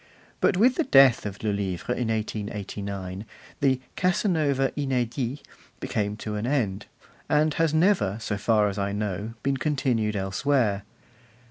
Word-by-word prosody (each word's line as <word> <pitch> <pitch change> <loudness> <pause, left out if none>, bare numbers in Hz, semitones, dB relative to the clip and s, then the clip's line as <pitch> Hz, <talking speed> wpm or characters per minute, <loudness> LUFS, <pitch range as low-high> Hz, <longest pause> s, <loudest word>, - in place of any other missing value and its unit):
But 180 - +3
with 245 +6 +4
the 330 - +3
death 135 - +5
of 100 +1 -8
Le 110 - +1
Livre 100 +2 -2
in 125 -2 -2
1889 100 -3 -4 0.4
the 135 -3 +2 0.2
'Casanova 160 -8 +1
inedit' 130 -1 -2 0.4
came 105 -1 -2
to 110 -1 -5
an 105 +3 -2
end, 110 -8 -1 0.4
and 155 +1 +3
has 165 -1 +1
never, 160 - +2
so 110 -2 -3
far 105 +1 +2
as 100 0 -3
I 100 0 -1
know, 105 +2 -3
been 135 0 +1
continued 125 -7 0
elsewhere. 100 +2 +1
115 Hz, 140 wpm, -26 LUFS, 100-140 Hz, 0.4 s, death